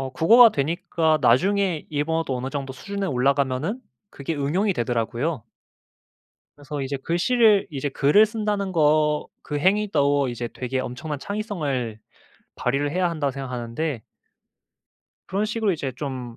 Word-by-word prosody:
어 135 -1 -4
국어가 230 - +7
되니까 160 +1 0
나중에 175 +7 +2
일본어도 150 -2 -1
어느 130 +2 -4
정도 135 -2 -4
수준에 200 +10 -5
올라 135 -1 +2
가면은 140 - -2 0.3
그게 140 +4 -5
응용이 180 +9 +1
되더라고요. 120 +3 -2 1.1
그래서 145 0 -6
이제 135 +1 -3
글씨를 205 - +3
이제 145 -1 -3
글을 150 +10 +4
쓴다는 210 -3 -2
거 150 -2 +2 0.2
그 150 - -3
행위도 145 -7 +2
이제 120 0 -4
되게 130 +2 -4
엄청난 135 +4 -4
창의성을 150 - -3 0.6
발휘를 140 +3 -1
해야 180 +1 +1
한다고 150 -5 -1
생각하는데 125 +1 -4 1.3
그런 200 +3 -1
식으로 215 -1 0
이제 140 -6 -4
좀 125 -3 -6
150 Hz, 325 characters per minute, -23 LUFS, 130-185 Hz, 1.3 s, 국어가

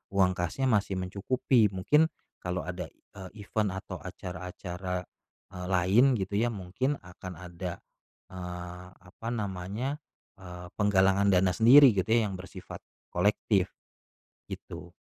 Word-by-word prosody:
uang 95 -2 +5
kasnya 90 +10 -2
masih 100 -4 +2
mencukupi 105 +5 +2
mungkin 150 +13 +3 0.4
kalau 90 0 -2
ada, 90 -2 -5
eee, 100 +2 -12
event 105 -3 0
atau - - -6
acara-acara, 90 0 -5 0.5
eee, 90 0 -6
lain 95 +7 +4
gitu 95 +1 -3
ya 120 - +2
mungkin 105 +9 -1
akan 90 0 -9
ada, 90 0 -6 0.5
eee, 90 0 -7
apa 90 +5 -12
namanya 105 - -3 0.4
eee, 90 -1 -9
penggalangan 100 -1 +4
dana 90 0 +4
sendiri 130 +3 +8
gitu 95 - 0
ya 110 -3 +3
yang - - -5
bersifat 95 0 -9 0.3
kolektif, 100 0 +2 0.8
gitu. - - -8
95 Hz, 125 wpm, -29 LUFS, 90-105 Hz, 0.8 s, sendiri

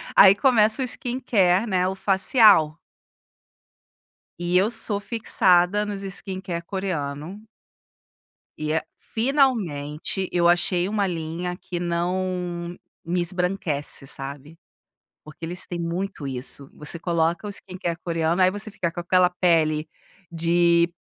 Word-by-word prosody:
aí 195 0 +9
começa 220 0 +3
o - - +1
skincare, 235 -6 +1
né, 185 -2 +1
o 190 - -2
facial. 190 - +4 1.6
E 175 +1 +1
eu 205 +5 +3
sou 205 -3 -1
fixada 200 -2 +2
nos 200 -1 -5
skincare 190 -3 -5
coreano 180 0 -4 1.1
e 155 0 -3
é 160 - +1 0.2
finalmente, 195 - 0
eu 175 -1 +3
achei 175 +1 +2
uma 205 -2 0
linha 170 +1 -4
que 180 -3 -6
não 175 0 -2 0.3
me 175 +1 0
esbranquece, 180 -6 -2
sabe. 140 +4 -7 0.7
Porque 155 +2 -9
eles 175 +2 -6
têm 175 -1 -5
muito 170 -1 -4
isso, 135 +1 -5
você 150 +2 -5
coloca 170 +2 0
o - - -4
skincare 180 -4 -4
coreano, 165 +1 0
aí 185 - +6
você 205 +2 -4
fica 175 -4 -2
com 175 - -7
aquela 180 +1 +3
pele 165 -4 +1 0.4
de 170 0 +3
180 Hz, 125 wpm, -24 LUFS, 165-195 Hz, 1.6 s, aí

